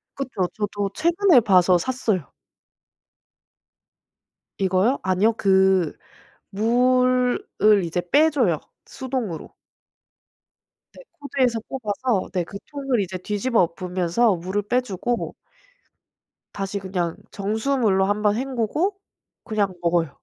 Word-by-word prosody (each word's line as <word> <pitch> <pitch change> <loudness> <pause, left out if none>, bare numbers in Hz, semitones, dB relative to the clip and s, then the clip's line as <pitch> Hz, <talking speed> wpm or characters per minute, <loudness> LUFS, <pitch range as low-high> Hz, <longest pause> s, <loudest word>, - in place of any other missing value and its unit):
그쵸. 250 -9 -2
저도 205 -2 -2
최근에 340 -2 +4
봐서 185 -3 +4
샀어요. 215 - -2 2.3
이거요? 190 +7 +2
아니요 190 +4 +2
그 190 -5 +3 0.5
물을 250 +4 +2 0.4
이제 175 +1 -2
빼 310 +2 +5
줘요 230 - +1 0.3
수동으로. 255 - -5 1.4
네. - - -13 0.2
코드에서 255 -5 0
뽑아서 230 -3 -2
네 180 -2 -1
그 200 +4 -9
통을 275 -5 -1
이제 190 -1 -3
뒤집어 210 +6 0
엎으면서 180 +5 0
물을 185 +4 -3
빼 245 +5 +1
주고 240 +1 -3 1.2
다시 195 0 -3
그냥 180 -3 -3
정수물로 215 -1 0
1 205 +2 0
번 210 0 +2
헹구고 270 - -1 0.5
그냥 210 -4 -1
먹어요. 170 -2 +1
210 Hz, 215 characters per minute, -23 LUFS, 190-255 Hz, 2.3 s, 빼